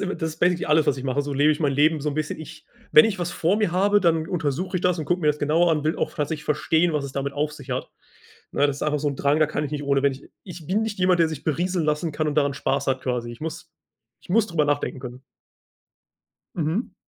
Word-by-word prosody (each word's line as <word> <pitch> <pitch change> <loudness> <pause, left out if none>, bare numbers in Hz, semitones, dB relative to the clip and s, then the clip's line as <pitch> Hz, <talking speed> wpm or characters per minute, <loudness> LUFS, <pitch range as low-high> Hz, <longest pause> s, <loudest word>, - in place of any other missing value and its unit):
imme 195 -1 -2
das 160 -1 -2
ist 160 - -12
basically 175 -1 +2
alles, 155 0 +3
was 135 - +2
ich 130 - -7
mache. 135 +2 0
So 145 0 -5
lebe 145 +3 +4
ich 150 - -5
mein 145 -3 +2
Leben 150 +3 +3
so 150 - -2
'n - - -5
bisschen. 155 0 -3
Ich 155 - -11 0.3
wenn 230 - +9
ich 220 -4 -1
was 175 -1 -2
vor 175 +5 +1
mir 210 -5 0
habe, 200 +3 +3
dann 165 -3 +2
untersuche 170 +2 -2
ich - - -2
das 180 -1 +1
und 155 - -3
gucke 175 +4 0
mir 155 - -1
das 150 0 +2
genauer 160 +4 +2
an, 155 -2 0
will 155 - 0
auch - - -2
tatsächlich 150 0 -3
verstehen, 160 +3 +1
was 150 -2 -1
es 135 - -6
damit 140 +1 -3
auf 150 +1 -1
sich 140 -3 -11
hat. 125 +1 -3 0.6
Ne, 145 - +3
das 140 -1 -2
ist - - -7
einfach 150 -1 0
so 150 - 0
'n 140 - -4
Drang, 140 +3 +2
da 155 - +4
kann 150 0 -3
ich 145 - -5
nicht 145 -1 -4
ohne 140 -1 +1
wenn 140 -1 +3
ich 135 - -12
ich 175 -4 -10
bin 200 +5 +1
nicht 220 -3 -4
jemand, 180 -1 +3
der 165 - +4
sich 155 -3 -7
berieseln 175 +2 0
lassen 150 +1 -1
kann 155 +1 -1
und 150 - -2
daran 140 -2 +2
Spaß - - -1
hat 130 -1 0
quasi. 125 -2 -2
Ich 120 - -11
muss 165 +2 -6 0.5
ich - - -20
muss 215 +4 +3
drüber 165 -6 +1
nachdenken 145 -2 -1
können. 125 0 -9 1.3
Mhm. 170 +8 -2
155 Hz, 275 wpm, -24 LUFS, 145-175 Hz, 1.3 s, wenn